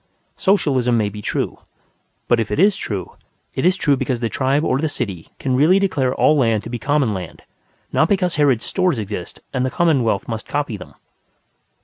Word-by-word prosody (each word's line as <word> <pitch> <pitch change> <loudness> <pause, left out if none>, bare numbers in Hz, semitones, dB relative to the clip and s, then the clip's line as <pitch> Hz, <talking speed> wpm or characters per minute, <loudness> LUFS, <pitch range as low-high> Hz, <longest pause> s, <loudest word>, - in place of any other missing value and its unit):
Socialism 135 - +2
may 105 -2 +1
be 105 +1 -8
true. - - -2 0.7
But 120 - +3
if 110 - -1
it - - -2
is 200 +2 +5
true, 100 - -5 0.4
it 130 - +1
is 185 +1 +2
true 145 -2 +3
because 130 -2 -2
the 115 -1 -1
tribe 140 +4 +1
or 130 -4 +1
the 160 +1 0
city 100 - -5
can 130 -2 -1
really 155 +8 +5
declare 145 -10 +1
all 155 - +4
land 115 -6 +2
to 115 - -8
be 120 - -3
common 140 -5 +1
land, 90 -4 -7 0.5
not 160 - +3
because 185 -3 +1
Harrod's 140 -6 +2
Stores 185 -7 +1
exist 100 -4 -6
and 130 -2 0
the 130 - 0
commonwealth 130 -11 +1
must 110 -1 -5
copy 145 -6 -2
them. 95 - -11
130 Hz, 195 wpm, -20 LUFS, 115-150 Hz, 0.7 s, is